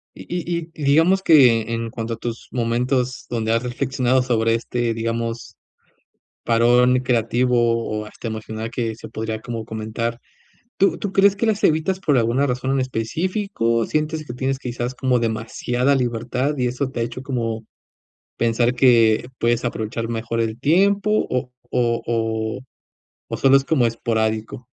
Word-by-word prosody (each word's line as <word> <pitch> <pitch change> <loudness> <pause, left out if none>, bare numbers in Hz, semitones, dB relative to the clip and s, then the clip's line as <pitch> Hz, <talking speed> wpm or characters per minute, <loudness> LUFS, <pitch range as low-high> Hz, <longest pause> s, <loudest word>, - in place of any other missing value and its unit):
Y - - -11 0.3
y - - 0 0.2
y 155 - -8
digamos 165 +7 +4
que 120 - +5
en 115 0 -3
cuanto 115 -1 -4
a - - -8
tus 115 +1 -6
momentos 125 +1 -1
donde 115 -2 -1
has 115 +1 +1
reflexionado 130 0 0
sobre 115 -2 +1
este, 120 0 -1
digamos 115 +1 -3 0.9
parón 120 +2 +4
creativo 125 0 +1
o 115 -2 0
hasta 115 - -7
emocional 110 0 -5
que 115 -2 -2
se 110 - -10
podría 110 0 -4
como 115 -1 -5
comentar, 110 +2 -4 0.6
¿tú 195 - +3
tú 200 -1 -4
crees 200 +1 +4
que 230 - 0
las 215 -2 0
evitas 165 +5 +2
por 150 -7 +2
alguna 120 +5 +2
razón 130 +1 -1
en 135 - +1
específico, 130 - -1
sientes 155 0 -2
que 120 - -6
tienes 135 +1 -1
quizás 120 -1 -4
como 125 -1 +1
demasiada 120 +3 0
libertad, 125 +3 -1
y 125 - 0
eso 125 +3 -1
te 120 - -4
ha - - +2
hecho 120 +2 -5
como 115 -5 -3 0.7
pensar 120 +1 +1
que 120 -3 +4
puedes 120 +1 +1
aprovechar 115 -1 -3
mejor 115 0 -2
el 110 0 -2
tiempo 195 - +3 0.2
o 125 0 -2 0.2
o 120 -1 +1
o 110 -1 -1 0.7
o - - -3
solo 135 0 +5
es 135 - -2
como 135 -7 +2
esporádico? 110 0 -1
120 Hz, 155 wpm, -21 LUFS, 115-130 Hz, 0.9 s, que